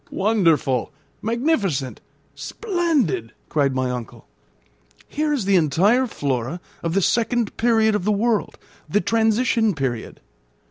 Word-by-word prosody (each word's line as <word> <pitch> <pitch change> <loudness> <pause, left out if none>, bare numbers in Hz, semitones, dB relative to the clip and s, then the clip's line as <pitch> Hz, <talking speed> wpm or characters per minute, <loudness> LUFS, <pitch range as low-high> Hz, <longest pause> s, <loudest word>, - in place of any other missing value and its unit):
"Wonderful, 165 - +1 0.3
magnificent, 220 - -1 0.3
splendid!" 325 - -1 0.2
cried 140 -3 +1
my 130 -1 0
uncle. 125 -3 -7 0.8
"Here 300 +1 -1
is 270 -9 -1
the 200 0 +3
entire 195 - +3
flora 140 - -3 0.2
of 165 +1 -2
the 195 - +2
second 235 0 0
period 225 -2 +3
of 210 - -1
the 210 - +1
world 215 +1 0 0.3
the 205 - +2
transition 225 -1 +1
period. 130 -5 -4
205 Hz, 120 wpm, -22 LUFS, 145-235 Hz, 0.8 s, the